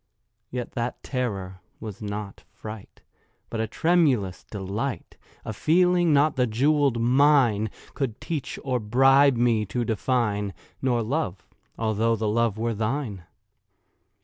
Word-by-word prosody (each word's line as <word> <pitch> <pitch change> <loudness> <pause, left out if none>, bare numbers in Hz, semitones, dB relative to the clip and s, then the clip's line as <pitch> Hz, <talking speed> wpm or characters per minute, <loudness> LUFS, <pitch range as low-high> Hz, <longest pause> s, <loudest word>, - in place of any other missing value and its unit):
Yet 125 -1 -5
that 120 0 -4
terror 100 -8 -3 0.2
was 110 0 -8
not 105 -1 -6
fright, 110 -2 -10 0.5
But 115 - -3
a 110 - -1
tremulous 135 - +1
delight— 105 +6 -4 0.3
A 110 - -4
feeling 175 - +3
not 150 +1 +4
the 125 -1 +3
jewelled 135 +2 +2
mine 125 -3 +4 0.2
Could 130 -7 -3
teach 155 -6 -4
or 130 -2 0
bribe 135 +5 +5
me 115 -2 +2
to 120 +5 -2
define— 105 -3 0 0.3
Nor 120 -3 +1
Love—although 110 - -2
the 110 0 -2
Love 110 0 +1
were 115 +1 -1
thine. 110 - -3
115 Hz, 120 wpm, -25 LUFS, 105-135 Hz, 0.5 s, bribe